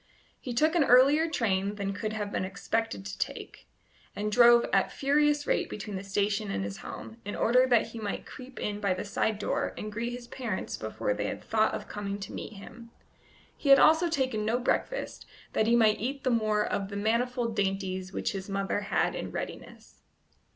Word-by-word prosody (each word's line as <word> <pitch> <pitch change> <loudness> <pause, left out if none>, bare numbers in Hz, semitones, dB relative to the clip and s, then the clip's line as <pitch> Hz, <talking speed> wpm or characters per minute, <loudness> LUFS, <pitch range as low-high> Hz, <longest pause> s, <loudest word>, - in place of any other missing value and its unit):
He 245 -2 -5
took 310 +6 +3
an 340 -4 +4
earlier 280 +6 +5
train 200 -8 0
than 200 -1 -3
he - - -2
could 215 +1 -3
have 210 -2 -3
been - - -1
expected 195 - -2
to 100 - -5
take, - - -5 0.5
and 210 +1 -2
drove 240 +1 +7
at 195 -1 +3
furious 295 +1 +2
rate - - 0
between 210 -1 -6
the 190 - -4
station 200 +1 -1
and 95 - -2
his 100 0 -5
home, 225 - -9
in 205 - -5
order 250 +2 +4
that 240 -3 +3
he 230 - -8
might 205 -2 -4
creep 260 0 -10
in 205 0 -3
by 200 -3 +1
the 185 - -5
side 210 +1 0
door 210 - -2
and 215 - -5
greet 230 +3 -3
his 245 0 -7
parents 235 -6 -4
before 110 -1 -2
they - - -3
had - - -5
thought 220 -1 +1
of - - -7
coming 200 -1 -4
to 195 - -7
meet - - -6
him. 230 +3 -12 0.7
He 285 - -3
had 275 - +10
also 320 +4 +5
taken 260 -8 0
no 225 +3 +1
breakfast, 375 - -2 0.3
that 220 - +2
he 235 - +4
might 220 -2 +4
eat 270 +5 -3
the 255 - +1
more 215 -2 +2
of 195 -1 -2
the 200 - -5
manifold 235 +2 0
dainties 190 -1 -2
which - - -2
his 195 0 -6
mother 195 0 -1
had 205 - 0
in - - -4
readiness. - - -8
215 Hz, 205 wpm, -29 LUFS, 200-245 Hz, 0.7 s, had